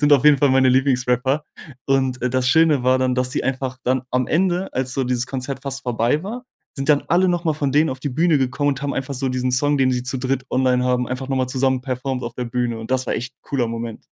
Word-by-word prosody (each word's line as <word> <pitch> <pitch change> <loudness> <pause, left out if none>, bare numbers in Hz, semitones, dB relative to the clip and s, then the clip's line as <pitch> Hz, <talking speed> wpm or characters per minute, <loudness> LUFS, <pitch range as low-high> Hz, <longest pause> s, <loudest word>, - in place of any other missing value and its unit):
sind 145 0 +4
auf 140 0 +5
jeden 150 -2 +6
Fall 140 0 +3
meine 130 0 +4
Lieblingsrapper 130 +2 +1 0.4
und, 130 -2 +1
äh, 125 - +1
das 130 0 +1
Schöne 160 -3 +4
war 130 0 +4
dann, 130 -1 +1
dass 125 0 -1
sie - - -1
einfach 130 -1 -2
dann 130 0 +1
am 125 0 0
Ende, 180 +2 0
als 130 0 -2
so 135 -2 0
dieses 125 0 -1
Konzert 135 0 -5
fast 135 -1 -5
vorbei 120 +5 0
war, 245 +5 -6 0.3
sind 135 +1 -4
dann 145 -1 +3
alle 180 +2 +3
noch 175 0 0
mal 160 - +2
von 145 -2 -1
denen 150 +3 +3
auf 130 0 -5
die 145 - -2
Bühne 160 +4 +2
gekommen 135 +2 0
und 135 0 -4
haben 145 -1 -1
einfach 135 +1 -3
so 135 +1 -2
diesen 130 0 -1
Song, 145 +2 +2
den 130 -1 +3
sie 125 -1 -1
zu 125 +1 -3
dritt 130 0 -1
online 130 -1 +2
haben, 125 -1 +1
einfach 130 +1 -5
noch 135 - -1
mal 130 -1 +1
zusammen 130 0 0
performed 130 -1 -3
auf 120 0 -6
der 125 -1 -4
Bühne 120 -1 -2
und 110 - -9
das 130 0 0
war - - -1
echt 125 0 -5
cooler 125 -5 -1
Moment. 115 -1 -6
130 Hz, 265 wpm, -21 LUFS, 125-140 Hz, 0.4 s, jeden